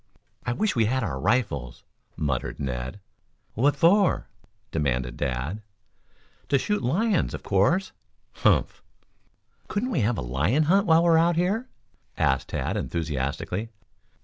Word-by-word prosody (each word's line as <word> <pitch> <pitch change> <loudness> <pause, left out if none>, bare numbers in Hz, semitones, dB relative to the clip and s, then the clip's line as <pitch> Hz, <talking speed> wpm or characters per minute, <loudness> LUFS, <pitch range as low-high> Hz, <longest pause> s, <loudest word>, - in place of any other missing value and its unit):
"I 120 - +1
wish 210 - 0
we 115 -2 +3
had 130 +3 0
our 75 -10 -3
rifles," 70 - -1 0.3
muttered 70 -5 -2
Ned. 65 +6 -4 0.5
"What 140 +6 +2
for?" 190 +3 +3 0.4
demanded 65 -5 -1
Dad. 70 - -3 0.9
"To 140 - +4
shoot 210 +10 -1
lions, 185 - +1
of - - -9
course." 165 - +2 0.5
"Humph!" - - +2 0.9
"Couldn't 245 +5 -2
we 220 - +1
have 110 +1 +1
a - - -2
lion 80 - +1
hunt 195 +6 +3
while 165 0 +5
we 170 - +3
are 165 -1 +6
out 170 +1 +3
here?" 200 +9 0 0.5
asked 65 0 +1
Tad - - -2
enthusiastically. 80 +6 -3
115 Hz, 135 wpm, -26 LUFS, -, 0.9 s, are